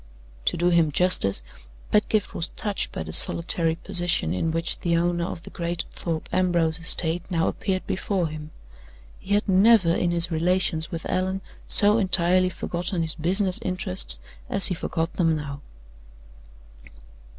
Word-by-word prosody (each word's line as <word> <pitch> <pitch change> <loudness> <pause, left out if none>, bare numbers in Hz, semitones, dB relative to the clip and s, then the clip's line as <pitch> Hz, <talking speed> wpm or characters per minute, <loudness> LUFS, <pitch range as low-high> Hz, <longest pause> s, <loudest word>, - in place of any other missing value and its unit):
To - - 0
do 175 +1 +2
him 165 -3 +2
justice, 140 - +2 0.5
Pedgift 210 0 +1
was 165 - -2
touched 205 0 -3
by - - -5
the 80 0 -8
solitary 165 - +3
position 175 - +1
in 90 - -1
which 165 +1 -1
the 170 -1 0
owner 170 0 0
of 170 - -7
the - - -11
great 170 0 -3
Thorpe 165 -2 -4
Ambrose 175 -3 +2
estate 165 +1 +2
now 165 -3 0
appeared 190 -2 -3
before 190 -2 -2
him. 155 -1 -8 0.7
He 200 +2 -1
had 210 - 0
never, 195 -2 +4
in 175 - 0
his 170 0 +2
relations 170 0 +1
with 165 -3 -6
Allan, 190 +1 -2 0.3
so 210 +2 +6
entirely 185 -1 +2
forgotten 175 0 -3
his 160 -1 -3
business 185 +3 +1
interests 185 0 -2 0.3
as 200 - 0
he - - +1
forgot 165 -1 -3
them 165 -3 +2
now. 145 -2 -6
175 Hz, 150 wpm, -24 LUFS, 165-185 Hz, 0.7 s, so